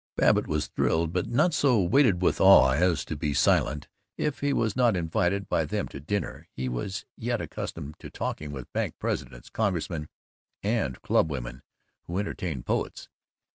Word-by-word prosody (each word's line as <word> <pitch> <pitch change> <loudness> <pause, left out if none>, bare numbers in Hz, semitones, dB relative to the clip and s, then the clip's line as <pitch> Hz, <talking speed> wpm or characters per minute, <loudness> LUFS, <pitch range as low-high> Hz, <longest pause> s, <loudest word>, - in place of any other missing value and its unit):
Babbitt - - +3
was 75 -1 0
thrilled, 80 0 0
but 90 - 0
not 155 +8 +2
so 135 -7 +3
weighted 100 -1 +3
with - - +2
awe 95 -9 +8
as 85 +5 +2
to 80 - -4
be 75 0 -2
silent. 70 +3 +2 0.3
If 150 -2 -1
he 145 0 +1
was 110 -6 0
not 120 -4 +3
invited 90 +4 0
by - - +1
them - - -2
to 70 - -8
dinner, 100 +9 -3
he 65 - -3
was 80 +11 -4
yet 120 0 -2
accustomed 75 +2 -6
to - - -9
talking 75 -1 -4
with 65 -4 -8
bank - - -1
presidents, - - -4
congressmen, 85 -7 -1 0.5
and 100 - 0
clubwomen 65 -5 0 0.5
who 85 - -3
entertained 90 -9 -3
poets. - - -2
90 Hz, 165 wpm, -27 LUFS, 75-110 Hz, 0.5 s, awe